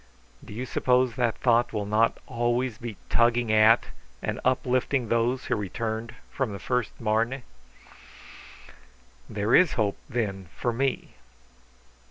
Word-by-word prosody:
Do - - -12
you 120 +5 -4
suppose 125 -1 +2
that 120 -3 0
thought 120 -1 +2
will 105 -2 -2
not 110 +2 +2
always 120 -1 -1
be 115 -4 -6
tugging 120 -1 +2
at 110 +2 +5 0.3
and - - -3
uplifting 130 0 +1
those 120 +2 +1
who 120 - 0
returned 110 +2 -4 0.2
from 130 -6 -2
the - - -5
first 125 +4 -2
Marne?" 115 +4 0 1.9
"There 105 +3 -1
is 180 -4 +6
hope, 105 -3 0
then, 95 -7 -3
for 120 - -1
me!" 135 +3 -2
115 Hz, 130 wpm, -26 LUFS, 110-125 Hz, 1.9 s, is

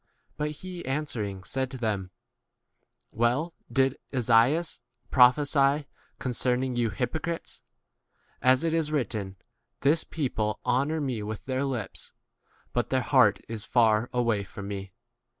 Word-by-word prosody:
6 - - -37
But 150 0 -1
he 180 -2 -6
answering 115 -9 -3
said 130 +6 -2
to 130 - -6
them, 105 -6 -2 1.0
Well 125 +9 +1 0.2
did 135 +1 +2
Esaias 125 +6 +3 0.3
prophesy 140 +2 +5 0.3
con 130 - -3
cerning 125 +1 0
you 120 -2 +1
hypocrites, 160 - -3 0.8
as 130 +2 +4
it 165 -1 +1
i3 160 -2 0
written, 105 -9 -2 0.5
This 155 +4 +3
people 110 -8 -2
honour 140 +6 +1
me 130 -6 -2
with 105 0 -5
their 130 +1 -1
lips, 125 -7 -4 0.6
but - - 0
their 130 -1 +2
heart 125 -8 +4
is 115 -1 -4
7 - - -24
far 115 -1 +4
away 115 -4 +1
from 100 +1 -8
me. 100 -1 -5
125 Hz, 135 wpm, -28 LUFS, 110-140 Hz, 1.0 s, prophesy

